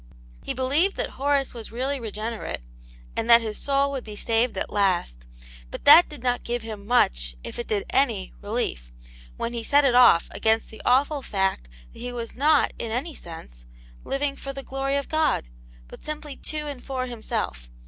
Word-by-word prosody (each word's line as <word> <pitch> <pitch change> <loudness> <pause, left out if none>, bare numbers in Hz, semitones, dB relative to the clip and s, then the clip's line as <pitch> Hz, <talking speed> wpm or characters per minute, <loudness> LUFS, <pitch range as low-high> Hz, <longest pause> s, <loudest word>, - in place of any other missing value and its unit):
He - - -4
believed 285 +10 +2
that - - -3
Horace 280 0 0
was 230 -2 -8
really 265 +4 -2
regenerate, 220 - -4 0.5
a - - +1
nd 230 - -6
that 235 0 +9
his 215 -2 -4
soul 280 0 +1
would 270 -2 -4
be 210 -1 -8
saved 230 +3 0
at - - -3
last; 175 - 0 0.4
but - - -8
that 310 +4 +9
did 295 -5 -10
not 245 -1 0
give 240 -1 -2
him 210 -3 -8
much, - - +2
if - - -7
it 240 - -4
did 205 -2 -1
any, 230 -9 +1
relief, 205 - -3 0.5
when 235 - -3
he 235 -1 -3
set 285 +5 +4
it 260 - +4
off 245 -9 +6
against 220 0 +1
the 220 - -10
awful 280 +3 +3
fact 190 - -1 0.3
that - - -13
he 245 +1 -4
was 235 -2 -5
not, 295 +3 +3
in 230 - -3
any 275 +8 -2
sense, 115 - -11 0.4
living 275 0 -1
forthe 275 -1 -7
glory 270 +1 -2
of 280 -1 -1
God, 315 - +1 0.4
but - - -13
simply 300 -2 -5
to 305 +2 -5
and 280 -4 -6
for 260 -2 -3
himself. 215 - -4
245 Hz, 190 wpm, -25 LUFS, 215-275 Hz, 0.5 s, that